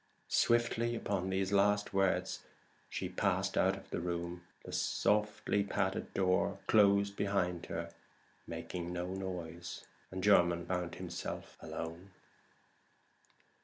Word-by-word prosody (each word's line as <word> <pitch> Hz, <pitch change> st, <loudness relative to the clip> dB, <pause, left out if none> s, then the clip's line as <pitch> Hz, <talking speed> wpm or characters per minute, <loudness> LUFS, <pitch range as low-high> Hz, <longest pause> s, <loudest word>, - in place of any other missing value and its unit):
Swiftly 120 Hz, 0 st, +3 dB
upon 100 Hz, -4 st, -1 dB
those 95 Hz, 0 st, 0 dB
last 105 Hz, +1 st, +3 dB
words 95 Hz, -1 st, +1 dB
Mrs. -, -, -21 dB, 0.5 s
Transome 95 Hz, -1 st, -4 dB
passed 95 Hz, -1 st, +1 dB
out 95 Hz, +1 st, +3 dB
of 95 Hz, -, -14 dB
the -, -, -1 dB
room. 85 Hz, 0 st, -3 dB, 0.2 s
The -, -, -7 dB
softly 105 Hz, -1 st, +1 dB
padded 100 Hz, -, -1 dB
door 95 Hz, +1 st, +2 dB
closed 100 Hz, -1 st, +5 dB
behind 90 Hz, -4 st, 0 dB
her 85 Hz, 0 st, -4 dB, 0.5 s
making 90 Hz, -1 st, -4 dB
no 90 Hz, +1 st, -3 dB
noise, 90 Hz, -3 st, -5 dB, 0.2 s
and 95 Hz, 0 st, -5 dB
Jermyn 85 Hz, -4 st, +5 dB
found 90 Hz, -2 st, -2 dB
himself 90 Hz, -1 st, -5 dB
alone. 85 Hz, +4 st, -6 dB
95 Hz, 120 wpm, -34 LUFS, 90-100 Hz, 0.5 s, closed